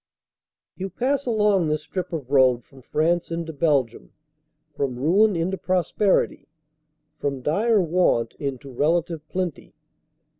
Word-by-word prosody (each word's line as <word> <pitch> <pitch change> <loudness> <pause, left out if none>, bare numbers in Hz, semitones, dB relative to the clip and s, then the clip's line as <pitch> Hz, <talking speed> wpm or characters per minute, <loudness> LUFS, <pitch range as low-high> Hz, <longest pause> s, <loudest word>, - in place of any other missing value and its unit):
* - - -70
You 190 +1 -3
pass 265 +7 -1
along 210 -6 +2
this 155 0 -1
strip 180 +5 -5
of 145 -6 -5
road 130 -3 +4
from 135 +2 -18
France 165 +6 0
into 165 -1 -4
Belgium 140 -6 0 0.6
from 135 -4 -2
ruin 190 +10 +3
into 180 +3 -1
prosperity, 185 +2 +1 0.7
from 140 -3 -3
dire 215 - +2
want 170 -10 +1
into 140 -1 -5
relative 165 +4 0
plenty. 180 -4 -4
165 Hz, 125 wpm, -24 LUFS, 140-185 Hz, 0.7 s, road